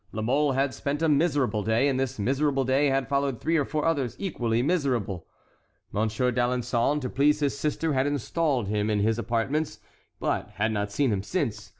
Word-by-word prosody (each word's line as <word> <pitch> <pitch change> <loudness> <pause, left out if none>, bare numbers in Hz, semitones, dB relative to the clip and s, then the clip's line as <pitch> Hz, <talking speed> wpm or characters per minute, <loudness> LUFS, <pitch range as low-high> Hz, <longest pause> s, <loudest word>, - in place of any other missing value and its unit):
La 110 - -4
Mole 140 +4 +2
had 135 +1 0
spent 145 +3 -3
a - - +4
miserable 145 -7 +2
day, 110 +6 +2
and 135 -2 0
this 135 0 -2
miserable 135 +5 +1
day 135 +3 +3
had 135 -2 +1
followed 140 -3 0
three 165 +1 0
or 150 - +3
four 150 +2 -2
others 140 -7 0
equally 120 - -1
miserable. 125 - -1 0.6
Monsieur 110 +4 0
d'Alençon, 125 +3 +1
to 130 - -2
please 145 +4 +2
his 140 -2 0
sister, 150 +2 -1
had 135 +1 +1
installed 145 - 0
him 105 +1 0
in 105 - +1
his 110 +3 +1
apartments, 125 +7 -1 0.4
but - - -1
had 110 +4 0
not 105 -1 -2
seen 135 +3 +1
him 95 - -1
since. 115 - -3
130 Hz, 190 wpm, -26 LUFS, 115-145 Hz, 0.6 s, a